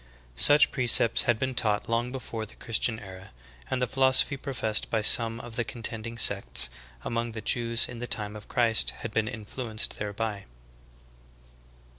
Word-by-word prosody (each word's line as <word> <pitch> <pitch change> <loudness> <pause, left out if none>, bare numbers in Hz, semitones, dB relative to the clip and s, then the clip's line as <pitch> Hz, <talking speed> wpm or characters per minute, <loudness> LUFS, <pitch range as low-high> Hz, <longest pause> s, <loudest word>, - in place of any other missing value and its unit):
Such 145 - +5
precepts 120 -3 +3
had 120 - +3
been 130 +3 -3
taught 110 -4 +1
long 115 +2 -1
before 115 -4 -6
the - - -15
Christian 115 0 -2
era, 95 -1 -12 0.4
and 130 - -2
the 125 - +1
philosophy 130 +2 +3
professed 125 -6 -2
by 110 -2 -1
some 115 +1 +5
of 120 -1 -9
the 120 - 0
contending 115 -1 -5
sects 100 - +1 0.3
among 115 0 -3
the 110 - -6
Jews 115 +1 +1
in 120 -1 -9
the 120 - -5
time 105 -3 -2
of 105 - -11
Christ 115 -2 +2
had 115 - -4
been 110 0 -1
influ 115 +1 -7
enced 110 - 0
thereby. 105 0 -4
115 Hz, 165 wpm, -27 LUFS, 110-120 Hz, 0.4 s, Such